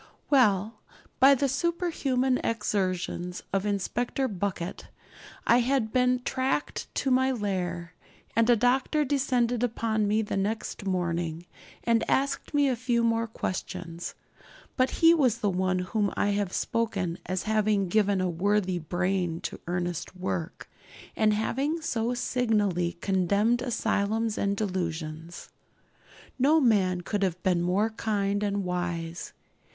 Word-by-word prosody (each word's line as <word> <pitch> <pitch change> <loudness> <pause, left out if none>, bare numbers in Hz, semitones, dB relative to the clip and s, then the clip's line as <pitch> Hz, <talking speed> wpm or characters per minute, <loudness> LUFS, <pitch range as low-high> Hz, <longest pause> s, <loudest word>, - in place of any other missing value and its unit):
Well, 215 -5 +3 0.4
by 275 +2 +7
the 275 +2 +1
superhuman 270 -4 0
exertions 185 -5 -2
of 195 +1 +1
Inspector 240 +6 -1
Bucket 190 -2 -4 0.6
I 240 - +5
had 245 -3 0
been 250 0 +2
tracked 265 +3 -1
to 270 - 0
my 260 +1 +3
lair, 180 -6 -3 0.4
and 230 +1 +3
a 240 - +7
doctor 260 +6 +2
descended 250 -4 +1
upon 220 -3 0
me 215 +2 +2
the 205 - -3
next 205 0 -3
morning, 170 -2 -1 0.4
and 230 -1 +2
asked 275 +1 0
me 290 -1 +3
a 260 - +1
few 240 0 0
more 230 0 +1
questions. 180 -5 -5 0.6
But 255 -1 +2
he 330 0 +5
was 260 -9 +3
the 205 -4 0
one 185 0 0
of - - -4
whom 205 -3 +1
I 205 - +2
have 200 -2 0
spoken 195 -8 -1
as 185 0 -1
having 215 -2 +1
given 200 +1 +2
a 185 - +1
worthy 185 +1 +1
brain 175 +1 -1
to - - -5
earnest 175 0 -3
work, 180 -2 -4 0.5
and 215 -1 +3
having 270 +9 0
so 240 -6 -1
signally 210 -9 0
condemned 200 +5 +2
asylums 225 -2 0
and 200 0 0
delusions. 170 -4 -4 0.9
No 295 +5 +5
man 195 - +3
could 205 +3 -2
have 180 -2 -1
been 180 -2 +2
more 195 +6 +1
kind 205 -2 -1
and 200 -1 -1
wise. 175 -2 -3
210 Hz, 135 wpm, -27 LUFS, 185-245 Hz, 0.9 s, by